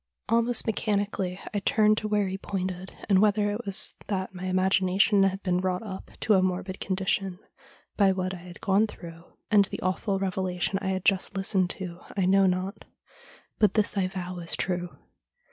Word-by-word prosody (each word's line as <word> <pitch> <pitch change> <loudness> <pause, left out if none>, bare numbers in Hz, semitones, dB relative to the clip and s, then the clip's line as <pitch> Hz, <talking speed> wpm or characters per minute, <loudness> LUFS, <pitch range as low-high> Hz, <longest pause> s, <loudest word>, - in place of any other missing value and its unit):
' - - -44
Almost 235 +1 +2
mechanically 200 -4 -1
I 205 - +1
turned 215 +1 +3
to 215 - -3
where 210 -2 +1
he 190 - -3
pointed, 185 -1 -4 0.2
and 195 -2 +5
whether 205 0 +3
it 210 +2 -5
was 195 - 0
that 190 -2 -2
my 185 0 -6
imagination 190 +2 +3
had 195 0 +1
been 180 -2 +1
wrought 185 +1 -1
up 190 -3 -7
to 215 - +3
a 190 - +5
morbid 185 +1 -2
condition 190 0 -1 0.6
by 200 -2 +5
what 185 0 -2
I - - -6
had 175 0 -12
gone 200 +3 +3
through 170 -4 -11 0.3
and 205 -1 +6
the - - -6
awful 190 +2 0
revelation 190 0 -1
I 195 - -3
had 190 -1 -2
just 195 0 +2
listened 190 -2 +1
to 180 -2 -6 0.2
I 190 - +2
know 195 +1 +5
not; 185 +2 -2 0.8
but 210 -3 +4
this 215 -1 +2
I 190 -2 +1
vow 180 -1 -5
is 170 -1 -2
true. 175 -1 -2
190 Hz, 185 wpm, -27 LUFS, 185-200 Hz, 0.8 s, and